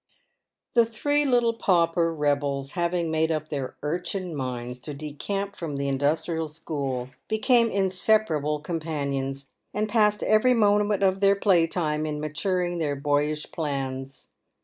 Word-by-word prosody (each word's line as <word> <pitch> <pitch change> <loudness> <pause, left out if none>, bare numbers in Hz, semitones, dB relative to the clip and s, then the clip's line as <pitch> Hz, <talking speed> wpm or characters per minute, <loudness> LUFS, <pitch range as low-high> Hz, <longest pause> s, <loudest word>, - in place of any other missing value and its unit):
The 235 - +6
three 290 +6 +1
little 240 -3 +3
pauper 170 -5 +2
rebels 145 -3 -1
having 170 -1 -1
made 160 +1 +1
up 155 -1 -2
their 140 -3 -4
urchin 180 +2 -3
minds 125 -2 -4
to 145 +3 -7
decamp 195 +8 -4
from 160 -6 -5
the 140 0 -2
Industrial 155 +4 0
School, 140 -5 -4 0.2
became 230 +2 +3
inseparable 185 -6 +1
companions, 140 -4 -3 0.3
and 210 +1 0
passed 210 -1 +2
every 215 +4 +4
moment 205 -2 +3
of 190 0 +3
their 200 0 +5
play 185 -5 +3
time 155 -3 -1
in 150 -1 -3
maturing 175 +4 -1
their 145 -3 0
boyish 150 +2 0
plans. 135 -3 -4
160 Hz, 135 wpm, -26 LUFS, 145-200 Hz, 0.3 s, The